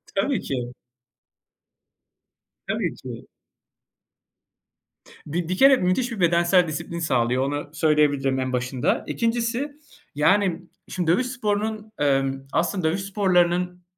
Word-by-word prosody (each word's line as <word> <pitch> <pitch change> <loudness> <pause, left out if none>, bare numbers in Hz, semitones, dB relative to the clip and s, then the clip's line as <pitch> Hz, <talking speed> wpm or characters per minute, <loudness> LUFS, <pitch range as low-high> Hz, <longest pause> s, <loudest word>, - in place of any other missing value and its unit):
Tabii 225 +7 0
ki. 125 -2 -4 1.9
Tabii - - -1
ki. - - -9 2.0
Bi 165 +3 -3
bir 185 - -1
kere 270 +3 +7
müthiş 210 +7 0
bir 225 - -5
bedensel 170 +1 +3
disiplin 170 +2 -5
sağlıyor, 125 -4 +1
onu 145 +1 -3
söyleyebilirim 145 -4 +2
en 130 0 -2
başında. 125 0 -1
2'ncisi, 235 +4 -1 0.4
yani 185 +3 +2 0.3
şimdi 170 -3 0
dövüş 250 +8 +1
sporunun, 215 -3 -2
emm, 135 -2 +2 0.2
aslında 175 -1 0
dövüş 185 +4 -2
sporlarının 180 -2 +1
175 Hz, 105 wpm, -24 LUFS, 145-205 Hz, 2.0 s, kere